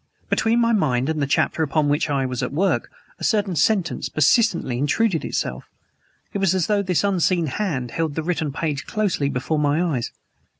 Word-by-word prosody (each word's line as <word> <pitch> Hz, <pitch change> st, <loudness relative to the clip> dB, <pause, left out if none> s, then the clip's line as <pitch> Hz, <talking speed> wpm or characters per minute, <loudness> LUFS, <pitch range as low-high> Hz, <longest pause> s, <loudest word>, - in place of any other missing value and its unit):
Between 230 Hz, +2 st, +2 dB
my 230 Hz, 0 st, +3 dB
mind 135 Hz, -, +1 dB
and 155 Hz, -1 st, -1 dB
the 140 Hz, -, 0 dB
chapter 150 Hz, -, +1 dB
upon 155 Hz, 0 st, +1 dB
which 145 Hz, +2 st, +1 dB
I 135 Hz, -2 st, 0 dB
was 130 Hz, 0 st, -3 dB
at 125 Hz, -, -2 dB
work 185 Hz, +7 st, 0 dB, 0.3 s
a -, -, -9 dB
certain 205 Hz, -5 st, +1 dB
sentence 185 Hz, +3 st, +1 dB
persistently 160 Hz, -, +2 dB
intruded 165 Hz, +5 st, +1 dB
itself. -, -, -3 dB, 0.7 s
It 200 Hz, -, -2 dB
was 190 Hz, -2 st, +2 dB
as 180 Hz, -3 st, +1 dB
though 210 Hz, -1 st, +1 dB
an 185 Hz, -3 st, -1 dB
unseen 185 Hz, -3 st, +2 dB
hand 135 Hz, -, -2 dB
held 160 Hz, -3 st, -2 dB
the 160 Hz, -, -2 dB
written 160 Hz, -3 st, -1 dB
page 145 Hz, -2 st, -3 dB
closely 195 Hz, -10 st, 0 dB
before 140 Hz, +4 st, -1 dB
my 145 Hz, +1 st, +2 dB, 0.2 s
eyes. 115 Hz, -, -4 dB
160 Hz, 185 wpm, -22 LUFS, 140-195 Hz, 0.7 s, my